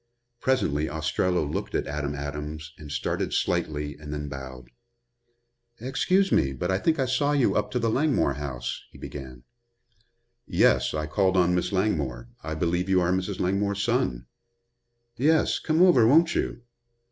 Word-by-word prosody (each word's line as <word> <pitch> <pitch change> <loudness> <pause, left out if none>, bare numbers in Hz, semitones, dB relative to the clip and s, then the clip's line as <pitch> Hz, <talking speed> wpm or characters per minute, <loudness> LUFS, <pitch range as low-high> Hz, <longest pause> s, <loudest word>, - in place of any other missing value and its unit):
Presently 80 - +1
Ostrello 80 +2 0
looked 70 - -4
at - - 0
Adam 75 0 -3
Adams 75 +2 -6
and 75 -2 -9
started 70 - -2
slightly 75 -1 -1
and 75 -1 -8
then 75 -1 -4
bowed. 65 -2 -9 1.1
"Excuse 185 - +1
me, 70 0 +2
but 90 +8 -2
I 95 - +1
think 160 +7 +1
I 135 - +1
saw 135 +3 +1
you 140 -4 +2
up 105 - 0
to - - -2
the 115 -1 0
Langmore 135 - +2
house," 65 -3 -5
he - - -16
began. 65 -4 -9 1.0
"Yes, - - +3
I 75 0 -1
called 95 +4 +1
on 90 -1 +4
Miss 90 +3 0
Langmore. 75 - -1
I 80 +1 -4
believe 85 +3 -1
you 95 -1 +4
are 90 0 +1
Mrs. 95 +1 -2
Langmore's 100 +2 0
son." - - 0 0.9
"Yes. 155 +5 +3
Come 160 +2 +2
over, 150 -12 +6
won't 160 +6 +5
you?" 120 - -2
85 Hz, 160 wpm, -26 LUFS, 75-110 Hz, 1.1 s, over